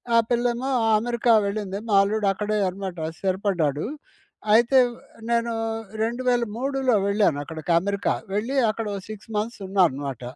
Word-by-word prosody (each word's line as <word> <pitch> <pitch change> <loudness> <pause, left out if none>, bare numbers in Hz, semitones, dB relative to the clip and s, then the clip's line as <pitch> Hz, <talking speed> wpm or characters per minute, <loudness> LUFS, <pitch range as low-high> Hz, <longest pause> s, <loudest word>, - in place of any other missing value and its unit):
ఆ - - +7
పిల్లేమో 240 +2 0 0.3
అమెరికా 235 +1 +1
వెళ్ళింది 200 -1 -3
మా 200 - +3
అల్లుడు 210 +1 -1
అక్కడే, 210 +2 -2
అనమాట 185 -1 -6 0.2
స్థిరపడ్డాడు. 185 -7 0 0.7
అయితే 240 +4 +5 0.5
నేను 235 0 +1 0.5
2003లో 245 +1 0
వెళ్ళాను 200 -7 +2
అక్కడికి, 160 +2 -5
అమెరికా 200 +2 -1 0.2
వెళ్ళి 225 +7 -1
అక్కడ 225 +1 -3
ఒక 195 - -5
6 215 +1 -9
మంత్స్ 220 +2 -3
ఉన్నా 195 0 +2
అనమాట. 135 -2 -6
210 Hz, 125 wpm, -24 LUFS, 195-235 Hz, 0.7 s, ఆ